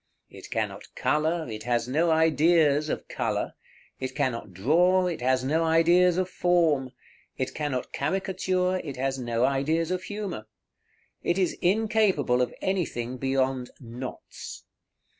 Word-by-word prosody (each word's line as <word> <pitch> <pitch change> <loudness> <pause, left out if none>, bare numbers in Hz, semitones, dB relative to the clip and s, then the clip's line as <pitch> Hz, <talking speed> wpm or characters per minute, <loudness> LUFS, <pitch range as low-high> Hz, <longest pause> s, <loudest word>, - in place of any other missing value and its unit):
It - - -11
cannot - - -4
color, 160 +2 +1
it 110 -2 -6
has 120 0 0
no 160 +6 +2
ideas 160 -1 +3
of - - -3
color; - - -2 0.5
it 130 -1 -4
cannot 120 -8 -2
draw, 175 - +3
it 175 -7 -3
has 130 0 +2
no 155 +5 +1
ideas 170 +2 +4
of 185 -1 +1
form; 170 -7 +2 0.5
it 130 - -2
cannot 145 -4 -3
caricature, 185 -1 0
it 140 -5 -6
has 135 +1 -1
no 120 0 0
ideas 155 +5 0
of 185 0 -1
humor. 195 - -5 0.7
It 175 - 0
is 185 -3 +1
incapable 195 - +2
of 125 - 0
anything 130 -10 -2
beyond 130 -1 0
knots. 125 +1 -8
155 Hz, 135 wpm, -27 LUFS, 130-180 Hz, 0.7 s, ideas